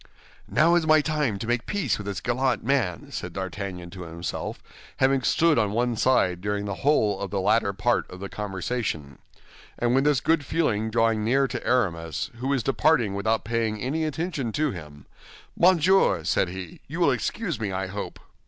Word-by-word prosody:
"Now 165 Hz, +3 st, +4 dB
is 170 Hz, -2 st, +2 dB
my 155 Hz, 0 st, +6 dB
time 150 Hz, -8 st, 0 dB
to 105 Hz, -, -5 dB
make 120 Hz, 0 st, -1 dB
peace 160 Hz, -, 0 dB
with 105 Hz, -, -7 dB
this 100 Hz, -1 st, -3 dB
gallant 125 Hz, +1 st, 0 dB
man," 115 Hz, -, 0 dB
said 90 Hz, -, -5 dB
D'Artagnan 95 Hz, -2 st, -5 dB
to 95 Hz, 0 st, -9 dB
himself, 85 Hz, 0 st, -5 dB, 0.4 s
having 135 Hz, 0 st, +3 dB
stood 155 Hz, +4 st, +3 dB
on 105 Hz, -2 st, 0 dB
one 120 Hz, +1 st, +1 dB
side 95 Hz, -7 st, +2 dB
during 105 Hz, +1 st, -2 dB
the 100 Hz, -, -3 dB
whole 110 Hz, -9 st, +2 dB
of 100 Hz, -, -4 dB
the 100 Hz, -, -2 dB
latter 105 Hz, +1 st, +2 dB
part 105 Hz, +5 st, 0 dB
of 90 Hz, -, -10 dB
the 100 Hz, -, -5 dB
conversation; 95 Hz, -, -4 dB, 0.6 s
and 120 Hz, 0 st, +1 dB
with 135 Hz, +2 st, +3 dB
this 150 Hz, -3 st, +3 dB
good 160 Hz, -2 st, +2 dB
feeling 110 Hz, -8 st, 0 dB
drawing 115 Hz, -1 st, +2 dB
near 135 Hz, +5 st, +3 dB
to -, -, -5 dB
Aramis, 85 Hz, -10 st, 0 dB
who 125 Hz, +3 st, -4 dB
was 135 Hz, -4 st, +1 dB
departing 135 Hz, -6 st, +2 dB
without 110 Hz, +3 st, 0 dB
paying 110 Hz, -1 st, -1 dB
any 145 Hz, +8 st, -1 dB
attention 155 Hz, -5 st, -2 dB
to 150 Hz, -1 st, +1 dB
him, 75 Hz, -, -10 dB, 0.5 s
"Monsieur," 180 Hz, -, +4 dB
said 90 Hz, +2 st, +1 dB
he, 90 Hz, -2 st, -8 dB
"you -, -, -6 dB
will -, -, +4 dB
excuse -, -, -2 dB
me, 105 Hz, -3 st, -2 dB
I 95 Hz, +1 st, -2 dB
hope." 100 Hz, +2 st, -6 dB
110 Hz, 185 wpm, -25 LUFS, 95-135 Hz, 0.6 s, my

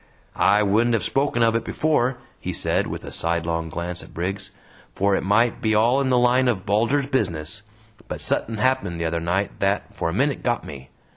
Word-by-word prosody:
"I 105 Hz, +1 st, +4 dB
wouldn't 115 Hz, +4 st, +2 dB
hev 110 Hz, -, -1 dB
spoken 135 Hz, -4 st, +1 dB
of 115 Hz, 0 st, +3 dB
it 115 Hz, -, 0 dB
before," 130 Hz, -2 st, 0 dB, 0.2 s
he -, -, -4 dB
said, -, -, +1 dB
with -, -, -6 dB
a -, -, -8 dB
sidelong 85 Hz, 0 st, -1 dB
glance 85 Hz, +2 st, -4 dB
at -, -, -14 dB
Briggs, 95 Hz, +3 st, -3 dB, 0.5 s
"for 100 Hz, 0 st, +2 dB
it -, -, 0 dB
might 110 Hz, +5 st, +2 dB
be 110 Hz, -1 st, +1 dB
all 120 Hz, +5 st, +3 dB
in 135 Hz, -, 0 dB
the 125 Hz, -, +3 dB
line 125 Hz, +1 st, +3 dB
o' 120 Hz, -, +2 dB
Bulger's 110 Hz, +9 st, +1 dB
'business,' 90 Hz, -, -2 dB, 0.5 s
but -, -, -5 dB
suthin' 110 Hz, 0 st, -1 dB
happened 130 Hz, -7 st, 0 dB
the 85 Hz, -, -1 dB
other 85 Hz, +1 st, -1 dB
night 90 Hz, +4 st, -1 dB
that, 100 Hz, +1 st, 0 dB
for -, -, -1 dB
a -, -, -3 dB
minit, 140 Hz, +7 st, 0 dB
got 120 Hz, -1 st, -1 dB
me! 70 Hz, -2 st, -10 dB
105 Hz, 205 wpm, -23 LUFS, 90-120 Hz, 0.5 s, I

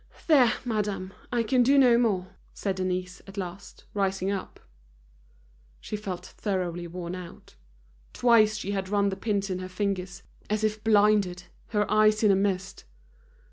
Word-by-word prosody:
"There, 270 Hz, -8 st, +5 dB
madame, 205 Hz, -4 st, -2 dB, 0.2 s
I 240 Hz, -1 st, +1 dB
can 250 Hz, +3 st, +2 dB
do 270 Hz, +4 st, +4 dB
no 250 Hz, -3 st, +6 dB
more," 190 Hz, -6 st, 0 dB, 0.3 s
said 195 Hz, -2 st, -2 dB
Denise, 185 Hz, -1 st, -3 dB
at 195 Hz, +1 st, -12 dB
last, 185 Hz, 0 st, -7 dB
rising 195 Hz, -1 st, 0 dB
up. 195 Hz, -2 st, -5 dB, 1.2 s
She -, -, -6 dB
felt 195 Hz, -4 st, -5 dB
thoroughly 175 Hz, -4 st, -3 dB
worn 175 Hz, 0 st, -6 dB
out. 180 Hz, -2 st, -10 dB, 0.6 s
Twice 220 Hz, -3 st, +4 dB
she 200 Hz, -2 st, -4 dB
had 195 Hz, -2 st, -3 dB
run 200 Hz, -1 st, +2 dB
the 190 Hz, -, -3 dB
pins 200 Hz, -2 st, -1 dB
in 185 Hz, -, -2 dB
her 185 Hz, 0 st, -6 dB
fingers, 185 Hz, -1 st, -3 dB, 0.3 s
as 215 Hz, +1 st, 0 dB
if 215 Hz, 0 st, -1 dB
blinded, 205 Hz, -4 st, +3 dB, 0.2 s
her 210 Hz, -2 st, +1 dB
eyes 215 Hz, 0 st, +4 dB
in 210 Hz, -, +6 dB
a -, -, +4 dB
mist. 195 Hz, -1 st, -1 dB
200 Hz, 155 wpm, -27 LUFS, 185-215 Hz, 1.2 s, no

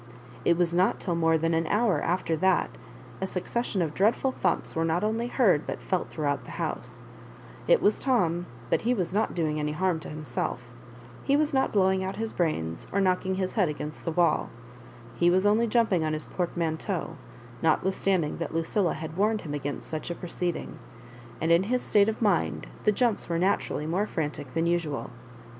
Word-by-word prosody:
It 170 Hz, -, +3 dB
was 170 Hz, -1 st, +1 dB
not 180 Hz, +2 st, +2 dB
till 180 Hz, -, -2 dB
more 165 Hz, -1 st, +3 dB
than 165 Hz, +1 st, 0 dB
an 165 Hz, 0 st, +1 dB
hour 205 Hz, -7 st, +2 dB
after 170 Hz, -1 st, 0 dB
that 190 Hz, +3 st, +2 dB, 0.5 s
a 190 Hz, -, 0 dB
succession 190 Hz, +1 st, -1 dB
of 155 Hz, -2 st, -3 dB
dreadful 225 Hz, -, +2 dB
thumps -, -, -1 dB
were 165 Hz, -, +1 dB
not 165 Hz, +3 st, +1 dB
only 225 Hz, +2 st, 0 dB
heard 205 Hz, -, +2 dB
but -, -, -3 dB
felt 185 Hz, -3 st, -2 dB
throughout 145 Hz, -3 st, -1 dB
the -, -, -9 dB
housa -, -, -5 dB, 0.6 s
It -, -, +4 dB
was 210 Hz, -, +3 dB
Tom, 175 Hz, -10 st, +1 dB, 0.2 s
but -, -, +3 dB
he 245 Hz, +2 st, +1 dB
was 180 Hz, -4 st, -2 dB
not 215 Hz, +2 st, 0 dB
doing 155 Hz, -3 st, 0 dB
any 150 Hz, 0 st, -1 dB
harm 180 Hz, 0 st, 0 dB
to -, -, -8 dB
himselC 150 Hz, -4 st, -3 dB, 0.7 s
He 280 Hz, -, +3 dB
was 305 Hz, 0 st, +1 dB
not 265 Hz, 0 st, +2 dB
blowing 190 Hz, -2 st, +3 dB
out 190 Hz, +1 st, -3 dB
his 225 Hz, 0 st, -4 dB
brains 80 Hz, -, -2 dB
or 200 Hz, -, +1 dB
knockmg 190 Hz, 0 st, +1 dB
his 185 Hz, -1 st, -2 dB
Head 195 Hz, -7 st, +2 dB
against 150 Hz, 0 st, -6 dB
the 165 Hz, -, -2 dB
wall 170 Hz, -1 st, +2 dB, 0.7 s
He 175 Hz, -, +4 dB
was 185 Hz, +2 st, +3 dB
only 215 Hz, +3 st, +4 dB
jumping 215 Hz, -7 st, +2 dB
on 155 Hz, 0 st, 0 dB
his 155 Hz, 0 st, -4 dB
portmanteau, 170 Hz, -3 st, -2 dB, 0.5 s
not 160 Hz, -1 st, +3 dB
withstanding 190 Hz, -4 st, 0 dB
that 170 Hz, -1 st, -4 dB
Lucilla 165 Hz, +3 st, +1 dB
had 160 Hz, 0 st, -6 dB
warned 210 Hz, +3 st, +1 dB
him 150 Hz, -, -6 dB
against 145 Hz, -1 st, -4 dB
such 155 Hz, +1 st, -4 dB
a 175 Hz, -, -3 dB
proceeding 175 Hz, -1 st, -4 dB, 0.3 s
— 120 Hz, 0 st, -18 dB
and 160 Hz, +1 st, +1 dB
in 170 Hz, +1 st, +6 dB
his 250 Hz, 0 st, +1 dB
state 205 Hz, 0 st, +4 dB
of 220 Hz, +1 st, -3 dB
mind 80 Hz, -, +1 dB, 0.2 s
the 210 Hz, -, +6 dB
jumps 230 Hz, -2 st, 0 dB
were 170 Hz, -, 0 dB
naturally 180 Hz, -4 st, 0 dB
more 185 Hz, +7 st, 0 dB
frantic 150 Hz, -6 st, -4 dB
than 165 Hz, 0 st, +1 dB
usual. 170 Hz, -4 st, -1 dB
175 Hz, 195 wpm, -27 LUFS, 160-200 Hz, 0.7 s, in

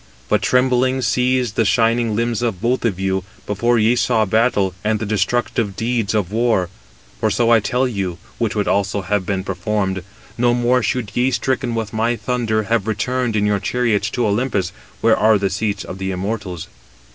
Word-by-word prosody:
But -, -, +2 dB
trembling 130 Hz, +1 st, +2 dB
seized 125 Hz, -1 st, +1 dB
the 115 Hz, -, +3 dB
shining 115 Hz, +1 st, +2 dB
limbs 115 Hz, 0 st, 0 dB
of 115 Hz, -7 st, -1 dB
both 120 Hz, +4 st, 0 dB
of 100 Hz, -5 st, 0 dB
you, 95 Hz, -1 st, 0 dB, 0.2 s
before 120 Hz, +4 st, +1 dB
ye 115 Hz, +2 st, +3 dB
saw 115 Hz, -3 st, +2 dB
battle, 105 Hz, -2 st, +2 dB
and 110 Hz, 0 st, +1 dB
the 110 Hz, -, -4 dB
destructive 105 Hz, 0 st, 0 dB
deeds 115 Hz, -2 st, -1 dB
of 100 Hz, -4 st, 0 dB
war. 110 Hz, -5 st, +1 dB, 0.5 s
For -, -, +1 dB
so 120 Hz, -1 st, +2 dB
I 115 Hz, -, +6 dB
tell 125 Hz, +5 st, 0 dB
you, 95 Hz, -7 st, -3 dB, 0.2 s
which 115 Hz, -3 st, -1 dB
would 105 Hz, -1 st, 0 dB
also 100 Hz, 0 st, 0 dB
have 95 Hz, 0 st, -1 dB
been 95 Hz, -2 st, -1 dB
performed: 95 Hz, +1 st, -2 dB, 0.4 s
no 120 Hz, 0 st, +3 dB
more 120 Hz, +1 st, +2 dB
should 125 Hz, -5 st, -2 dB
ye, 125 Hz, +2 st, +2 dB
stricken 130 Hz, -2 st, -1 dB
with 110 Hz, -1 st, -3 dB
my 115 Hz, +2 st, +1 dB
thunder, 115 Hz, -3 st, -1 dB
have 110 Hz, -1 st, 0 dB
returned 115 Hz, +2 st, -1 dB
in 105 Hz, -1 st, +2 dB
your 105 Hz, -1 st, +1 dB
chariots 115 Hz, -4 st, 0 dB
to 120 Hz, -, +2 dB
Olympus, 105 Hz, -3 st, 0 dB, 0.3 s
where -, -, +5 dB
are 110 Hz, 0 st, +4 dB
the 100 Hz, -1 st, -1 dB
seats 105 Hz, -2 st, -2 dB
of 95 Hz, -, -8 dB
the 95 Hz, 0 st, -2 dB
immortals." 95 Hz, -2 st, -4 dB
110 Hz, 185 wpm, -19 LUFS, 100-120 Hz, 0.5 s, I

